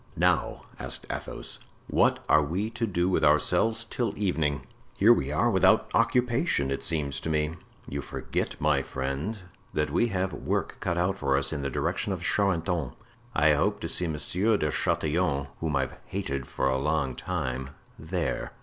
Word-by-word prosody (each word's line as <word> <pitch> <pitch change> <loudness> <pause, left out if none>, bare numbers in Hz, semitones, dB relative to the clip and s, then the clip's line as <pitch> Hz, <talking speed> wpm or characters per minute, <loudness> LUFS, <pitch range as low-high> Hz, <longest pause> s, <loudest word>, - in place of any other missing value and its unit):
"Now," - - +1 0.2
asked - - -4
Athos, - - -5 0.3
"what - - +2
are 75 - +6
we 90 +9 -2
to 115 0 -1
do 90 -3 +1
with 95 - +1
ourselves 110 +9 +3
till 115 -1 -2
evening? 80 -8 0 0.3
Here 110 +4 +7
we 70 - -1
are 120 +11 +2
without 95 -3 +4
occupation, 115 - +2
it 70 - -2
seems 70 -4 -1
to - - -4
me." 75 0 +1 0.3
"You 70 +1 -3
forget, - - -3
my - - +3
friend, 70 +11 -3 0.4
that 75 0 0
we 120 - +3
have 95 -3 -1
work - - -2
cut 85 - -1
out 95 +2 0
for 70 -1 +2
us 70 +2 +1
in 70 - -3
the 70 - -2
direction - - -1
of - - -5
Charenton; 85 -8 +1 0.4
I 75 +1 +5
hope 100 +8 +1
to - - -2
see 90 +1 -1
Monsieur 90 +7 +1
de 75 -4 0
Chatillon, 75 -3 0
whom 80 -3 -1
I've 65 -2 -1
hated 75 -9 -3
for - - -1
a 65 0 +1
long 70 -2 0
time, 65 -7 -3 0.3
there." 80 -4 -2
80 Hz, 170 wpm, -28 LUFS, 70-100 Hz, 0.4 s, Here